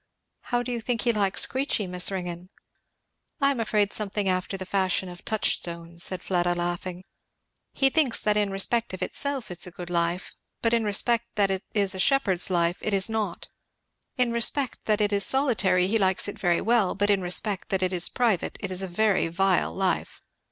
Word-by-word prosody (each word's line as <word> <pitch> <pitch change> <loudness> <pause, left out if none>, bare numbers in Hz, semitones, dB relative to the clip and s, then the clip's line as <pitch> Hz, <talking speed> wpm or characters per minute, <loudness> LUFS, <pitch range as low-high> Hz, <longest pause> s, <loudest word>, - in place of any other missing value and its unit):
"How 245 -1 -1
do 250 - -5
you 235 -1 -3
think 230 +1 -2
he 240 - +2
likes 200 -3 +2
Queechy, 260 -5 -1
Miss 180 0 +1
Ringgan?" 180 -2 -6 0.9
"I 275 -1 +3
am 265 - -3
afraid 210 -2 0
something 205 -1 -1
after 185 +1 -1
the 190 - -6
fashion 190 -1 +1
of 175 0 -11
Touchstone," 170 -5 -1
said 185 +1 +1
Fleda 175 -1 0
laughing; 175 +1 -4 0.7
"he 270 -1 +2
thinks 285 -6 +2
that 210 0 +1
'in 210 -1 +1
respect 195 +2 0
of - - -4
itself 280 -7 -3
it 175 - -7
is - - -1
a - - -9
good 175 0 -9
life; 170 +1 -1 0.3
but 230 0 +2
in 230 -1 +2
respect 230 +3 +2
that 200 -2 +2
it 190 0 -3
is 200 -2 +3
a 190 - -6
shepherd's 195 -8 +2
life 175 -1 +1
it 215 - -2
is 195 +2 +2
naught. 215 -5 -3 0.7
In 250 -2 +2
respect 235 +3 +1
that 215 -1 +2
it 205 0 +1
is 200 0 +3
solitary, 225 -10 +2
he 220 +3 +1
likes 190 -1 +2
it 205 - -7
very 175 -4 +1
well; 225 -3 +2
but 205 +1 +2
in 200 -2 +2
respect 185 +2 -1
that 190 -1 0
it 185 0 0
is 175 -2 +2
private, 225 -8 0
it 195 - -5
is 185 0 0
a 190 - -3
very 200 0 +1
vile 185 +2 +1
life. 190 -1 -2
195 Hz, 200 wpm, -25 LUFS, 180-225 Hz, 0.9 s, I